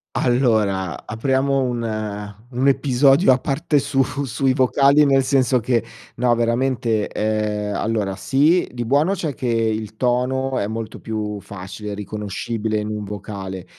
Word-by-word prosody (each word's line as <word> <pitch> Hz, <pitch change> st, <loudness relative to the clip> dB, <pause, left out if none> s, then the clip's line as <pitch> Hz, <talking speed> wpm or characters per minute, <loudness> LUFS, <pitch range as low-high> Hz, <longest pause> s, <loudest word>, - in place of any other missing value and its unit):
Allora, 110 Hz, -7 st, +1 dB
apriamo 135 Hz, +4 st, +1 dB
un 110 Hz, -4 st, -3 dB, 0.2 s
un 130 Hz, +2 st, 0 dB
episodio 135 Hz, +3 st, +4 dB
a 130 Hz, -, +3 dB
parte 145 Hz, +3 st, 0 dB
su 140 Hz, -1 st, +1 dB, 0.2 s
sui 135 Hz, +2 st, +1 dB
vocali 140 Hz, +3 st, +4 dB
nel 135 Hz, -1 st, +4 dB
senso 130 Hz, -1 st, +2 dB
che, 115 Hz, -1 st, 0 dB, 0.3 s
no 120 Hz, 0 st, +3 dB
veramente, 115 Hz, -2 st, 0 dB
ehm, 105 Hz, -1 st, -1 dB
allora 105 Hz, -2 st, -1 dB
sì 150 Hz, -, +2 dB
di 120 Hz, -1 st, -4 dB
buono 145 Hz, +10 st, +2 dB
c'è 165 Hz, -6 st, -3 dB
che 125 Hz, -, -4 dB
il 110 Hz, -2 st, -1 dB
tono 130 Hz, +2 st, 0 dB
è 100 Hz, -, -1 dB
molto 110 Hz, 0 st, -5 dB
più 105 Hz, -2 st, -4 dB
facile, 100 Hz, +2 st, -7 dB
riconoscibile 105 Hz, +2 st, -3 dB
in 105 Hz, 0 st, -3 dB
un 105 Hz, -1 st, -4 dB
vocale. 95 Hz, -2 st, -6 dB
115 Hz, 140 wpm, -21 LUFS, 105-135 Hz, 0.3 s, episodio